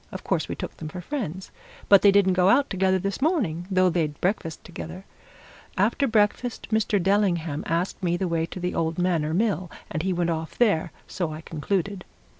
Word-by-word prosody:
Of - - -7
course, - - -1
we - - -3
took - - -7
them 155 - -6
for 180 - -7
friends. 190 - -5 0.4
But 200 -1 +7
they 205 - +7
didn't 195 -2 +4
go 180 +1 +4
out 280 +7 +3
together 190 -1 +2
this 195 +5 -3
morning, 210 - 0
though 185 -1 +3
they'd 155 -4 -1
breakfast 175 -4 -2
together. 175 +2 -8 0.7
After 225 +8 +2
breakfast, 225 +2 0
Mr. 215 -2 +2
Dellingham 175 -6 +1
asked 170 +5 -1
me 175 -1 +1
the 185 - -1
way 165 -1 0
to 185 - -8
the 180 0 -2
old 160 0 -1
Manor 165 -4 +1
Mill, 190 -3 0 0.2
and 155 - -2
he 190 +2 -1
went 175 -1 0
off 160 0 -4
there, 185 -8 +2
so 175 -4 -3
I 155 +1 -7
concluded. 180 +5 -2
Mr. - - -33
185 Hz, 200 wpm, -25 LUFS, 165-200 Hz, 0.7 s, But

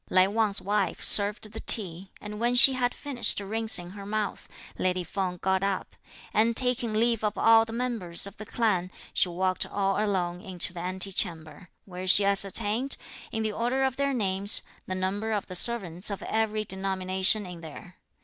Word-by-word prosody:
Lai 185 0 +4
Wang's 210 -1 0
wife 205 +2 -2
served 210 +1 +5
the 225 - -8
tea; 190 -4 +3
and 210 0 -9
when 240 +2 0
she 265 +2 +8
had 245 -1 -1
finished 270 -6 0
rinsing 205 -3 +2
her 200 0 -10
mouth, 210 +1 -4 0.3
lady 185 -1 -1
Feng 180 +1 -4
got 190 +1 -1
up; 195 -1 -3 0.4
and, 225 +1 +1
taking 250 -2 +1
leave 230 +1 0
of 210 -1 -2
all 225 0 +5
the 225 - -9
members 230 -9 -1
of 200 +1 -8
the 215 - -9
clan, 185 -6 -1 0.2
she 180 - +2
walked 185 +1 -1
all 195 +1 -1
alone 180 -4 -2
into 180 -2 -5
the 170 - -7
ante 185 +2 -3
chamber, 165 -1 -5 0.2
where 185 -1 -8
she 195 +2 +5
ascertained, 205 +6 +2 0.3
in 220 -1 -3
the 215 - -2
order 245 +5 -1
of 265 -1 -1
their 280 0 -1
names, 200 -4 +1 0.2
the 185 - -4
number 200 +4 -3
of 210 -2 -2
the 185 - -10
servants 185 -3 +1
of 200 - -6
every 215 -1 -2
denomination 190 +1 +1
in 180 -2 -10
there. 170 +3 -12
200 Hz, 180 wpm, -26 LUFS, 185-225 Hz, 0.4 s, she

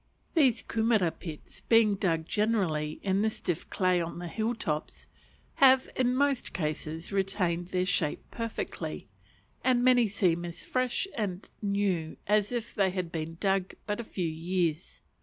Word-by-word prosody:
These 270 -8 +3
kumera 220 -6 +2
pits, 160 -3 -9
being 225 -2 +6
dug 170 -5 0
generally 180 -8 0
in 195 0 +2
the 220 - +3
stiff 175 -6 -3
clay 185 -2 +2
on 170 0 -4
the 175 0 -5
hill 220 +7 -1
tops, 155 -8 -3 0.5
have, 265 -1 +6
in 250 -1 +2
most 280 -1 +1
cases, 155 0 -3
retained 185 -3 0
their 185 0 0
shape 165 -5 0
perfectly; 230 -1 -5 0.5
and 250 -1 +3
many 245 -2 +5
seem 180 -4 +1
as 175 0 -6
fresh 255 +6 0
and 200 -4 -3
new 200 -6 0
as 210 +1 +2
if 235 -2 -3
they 195 -3 +2
had 180 -2 -3
been 165 0 -4
dug 195 -2 0
but 210 +1 -2
a - - -3
few 185 -5 -3
years. 165 0 -2
195 Hz, 155 wpm, -29 LUFS, 170-225 Hz, 0.5 s, being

